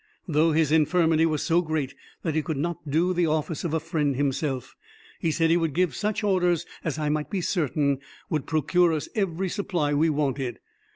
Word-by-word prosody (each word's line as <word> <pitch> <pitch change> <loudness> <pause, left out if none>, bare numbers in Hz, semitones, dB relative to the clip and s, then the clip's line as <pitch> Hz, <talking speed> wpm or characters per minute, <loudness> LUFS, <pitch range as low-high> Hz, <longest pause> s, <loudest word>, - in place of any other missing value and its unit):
Though 160 0 +3
his 155 -1 +2
infirmity 160 +1 +3
was 155 -2 -1
so 170 +1 +3
great 155 -5 -2 0.3
that 160 - -1
he 155 - +1
could 155 -1 -3
not 155 0 -3
do 170 +5 +2
the 175 -1 +2
office 155 0 -1
of 170 - -2
a 160 - +1
friend 155 -4 -1
himself, 135 -1 -2 0.4
he 165 - 0
said 165 +1 +2
he 170 - +5
would 165 -4 -1
give 180 -5 +2
such 210 - -2
orders 180 -4 +2 0.2
as 155 -3 -2
I 150 -1 -1
might 150 0 -1
be 195 - -1
certain 145 -6 0 0.3
would 155 -5 -2
procure 165 +2 +2
us 155 - -3
every 190 -3 0
supply 175 -6 -1
we 155 +3 +3
wanted. 140 -4 -1
160 Hz, 195 wpm, -26 LUFS, 150-175 Hz, 0.4 s, he